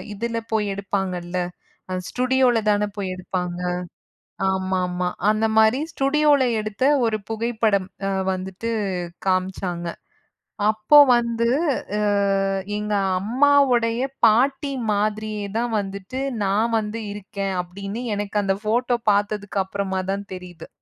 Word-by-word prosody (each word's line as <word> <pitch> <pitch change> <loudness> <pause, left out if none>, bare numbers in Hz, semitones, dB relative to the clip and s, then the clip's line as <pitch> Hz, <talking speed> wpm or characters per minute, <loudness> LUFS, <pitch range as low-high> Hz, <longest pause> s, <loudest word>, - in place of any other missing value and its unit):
இதுல 230 +2 -2
போய் 210 -2 +1
எடுப்பாங்க 195 -1 -2
இல்ல, 175 +1 -4 0.5
ஆ - - -3 0.2
ஸ்டுடியோல 255 -1 +2
தான 205 0 +1
போய் 190 -2 -2
எடுப்பாங்க. 180 -1 -4 0.9
ஆமாமா. 185 -1 -1 0.2
அந்த 215 +1 +2
மாரி 220 +4 +5
ஸ்டுடியோல 290 0 +3 0.2
எடுத்த 215 +2 -3 0.2
ஒரு 220 -1 +1
புகைப்படம் 220 -3 0 0.2
அ - - 0 0.2
வந்துட்டு 190 +4 -5 0.6
காமிச்சாங்க. 185 -2 -1 0.8
அப்போ 215 +6 +3 0.2
வந்து, 235 -1 0 0.5
ஆ - - 0 0.8
எங்க 210 0 -2 0.3
அம்மாவுடைய 245 0 +3 0.2
பாட்டி 270 +6 +3 0.2
மாதிரியே 215 0 -1
தான் 240 +1 0
வந்துட்டு 200 +5 -5 0.2
நான் 215 +4 +1
வந்து 215 +1 -4
இருக்கேன் 195 -1 -4
அப்டின்னு 200 +5 -6
எனக்கு 205 0 -1
அந்தப் 195 +1 -1
ஃபோட்டோ 240 +3 +1
பாத்ததுக்கு 205 0 0
அப்புறமாதான் 195 0 -3
தெரியுது. 180 -2 -10
210 Hz, 110 wpm, -23 LUFS, 190-230 Hz, 0.9 s, மாரி